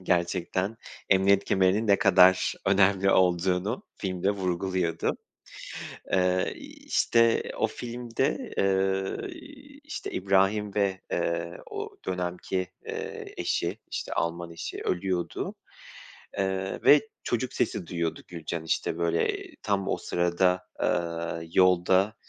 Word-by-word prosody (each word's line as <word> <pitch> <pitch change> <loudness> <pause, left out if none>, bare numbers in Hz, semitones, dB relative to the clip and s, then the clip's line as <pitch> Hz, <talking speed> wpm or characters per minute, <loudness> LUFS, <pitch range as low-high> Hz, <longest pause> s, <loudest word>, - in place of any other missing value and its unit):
gerçekten 90 +3 0 0.3
emniyet 100 +1 +4
kemerinin 95 +3 +2
ne 100 -1 +5
kadar 95 -1 +5
önemli 95 0 +4
olduğunu 90 +4 +2 0.2
filmde 95 0 0
vurguluyordu. 90 -3 -1 1.0
Eee, 90 0 +2
iii, - - -13
işte, 115 -1 +3
o - - +2
filmde, 125 - -3
ııı, 95 - +1
iii, 290 -3 -13
işte, 305 - -6
İbrahim 100 +2 +2
ve, 100 -2 +1
eee, 85 0 -1
o - - -6
dönemki, 90 0 -2 0.2
eee, - - -6
eşi, - - -1
işte, - - -3
Alman 85 +1 -2
eşi 85 - -6
ölüyordu. 90 -1 -2 0.8
Eee, 95 0 -1
ve 150 - +8 0.2
çocuk 120 +1 -1
sesi 90 - -1
duyuyordu 85 -2 -2
Gülcan. 85 -1 -5
İşte, 80 - -1
böyle, 85 -1 +1
eee, - - -11
tam 100 -1 0
o - - +1
sırada, 90 +1 +1
aaa, 85 -1 -1
yolda, 95 +3 +4
95 Hz, 115 wpm, -27 LUFS, 90-100 Hz, 1.0 s, ve